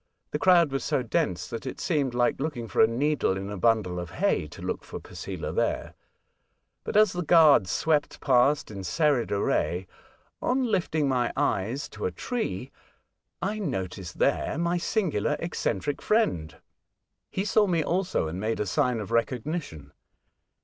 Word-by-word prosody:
The 150 Hz, -, -2 dB
crowd 170 Hz, -1 st, +5 dB
was 135 Hz, -, -2 dB
so 130 Hz, -, 0 dB
dense 90 Hz, -6 st, -1 dB
that 115 Hz, +5 st, -6 dB
it -, -, -6 dB
seemed 145 Hz, -7 st, 0 dB
Hke 120 Hz, 0 st, +1 dB
looking 135 Hz, -6 st, -3 dB
for -, -, +1 dB
a 110 Hz, -, +7 dB
needle 130 Hz, -3 st, 0 dB
in 100 Hz, +1 st, -5 dB
a -, -, -4 dB
bundle 100 Hz, -3 st, +1 dB
of 90 Hz, -2 st, -6 dB
hay -, -, 0 dB
to -, -, -13 dB
look -, -, -4 dB
for -, -, -7 dB
Posela -, -, -6 dB
there; -, -, -1 dB, 0.9 s
but, -, -, -1 dB
as 215 Hz, -3 st, +5 dB
the 180 Hz, -, -2 dB
Gruards 155 Hz, -, +6 dB
swept 150 Hz, -, 0 dB
past 135 Hz, 0 st, +3 dB
in 100 Hz, -2 st, -6 dB
serried 145 Hz, -, +1 dB
array, 95 Hz, -2 st, 0 dB, 0.6 s
on 260 Hz, +1 st, +1 dB
lifting 180 Hz, -, 0 dB
my 125 Hz, -3 st, +1 dB
eyes 125 Hz, -1 st, 0 dB
to 105 Hz, -, -3 dB
a -, -, -3 dB
tree, 130 Hz, -, -4 dB, 0.7 s
I 210 Hz, +3 st, -1 dB
noticed 95 Hz, -, -4 dB
there -, -, +1 dB
my 170 Hz, +1 st, +1 dB
singular, 160 Hz, -, 0 dB
eccentric 145 Hz, -, -2 dB
friend. 90 Hz, -, 0 dB, 0.7 s
He 190 Hz, -, -2 dB
saw 210 Hz, +1 st, +3 dB
me 170 Hz, -4 st, +1 dB
also, 180 Hz, -, 0 dB
and 85 Hz, +4 st, -5 dB
made 110 Hz, +2 st, -1 dB
a 105 Hz, -, 0 dB
sign 125 Hz, +3 st, +1 dB
of 105 Hz, +1 st, -6 dB
recognition. 115 Hz, -, -2 dB
130 Hz, 165 wpm, -27 LUFS, 100-165 Hz, 0.9 s, a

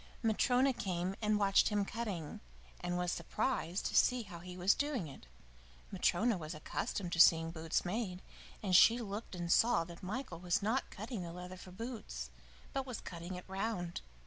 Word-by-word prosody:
Matryona 250 Hz, +4 st, +3 dB
came 185 Hz, -3 st, -2 dB
and 210 Hz, -1 st, +2 dB
watched 200 Hz, -1 st, +4 dB
him 205 Hz, -2 st, +1 dB
cutting, 195 Hz, -9 st, -4 dB, 0.4 s
and 175 Hz, 0 st, -2 dB
was 180 Hz, 0 st, 0 dB
surprised 200 Hz, -6 st, -1 dB
to -, -, -1 dB
see 250 Hz, -1 st, +4 dB
how 175 Hz, -4 st, -9 dB
he 180 Hz, +1 st, -9 dB
was 185 Hz, +3 st, +4 dB
doing 285 Hz, -, -1 dB
it. 135 Hz, -, -12 dB, 0.6 s
Matryona 225 Hz, -4 st, +2 dB
was 155 Hz, 0 st, -5 dB
accustomed 175 Hz, +4 st, -3 dB
to 165 Hz, -, -1 dB
seeing 165 Hz, -1 st, +7 dB
boots 160 Hz, 0 st, -1 dB
made, 185 Hz, -1 st, -2 dB, 0.4 s
and 185 Hz, -3 st, +2 dB
she 230 Hz, +5 st, +8 dB
looked 210 Hz, -3 st, -5 dB
and 175 Hz, -1 st, -2 dB
saw 225 Hz, -7 st, +5 dB
that 170 Hz, 0 st, -11 dB
Michael 190 Hz, -2 st, -4 dB
was 175 Hz, +2 st, 0 dB
not 235 Hz, +6 st, 0 dB
cutting 215 Hz, 0 st, -5 dB
the 170 Hz, -1 st, -5 dB
leather 180 Hz, +1 st, -7 dB
for 185 Hz, -, -11 dB
boots, 225 Hz, +4 st, -6 dB, 0.4 s
but 270 Hz, -1 st, -2 dB
was 250 Hz, -4 st, -4 dB
cutting 175 Hz, +1 st, -7 dB
it 180 Hz, -, -8 dB
round. 190 Hz, -3 st, -3 dB
190 Hz, 175 wpm, -35 LUFS, 175-225 Hz, 0.6 s, she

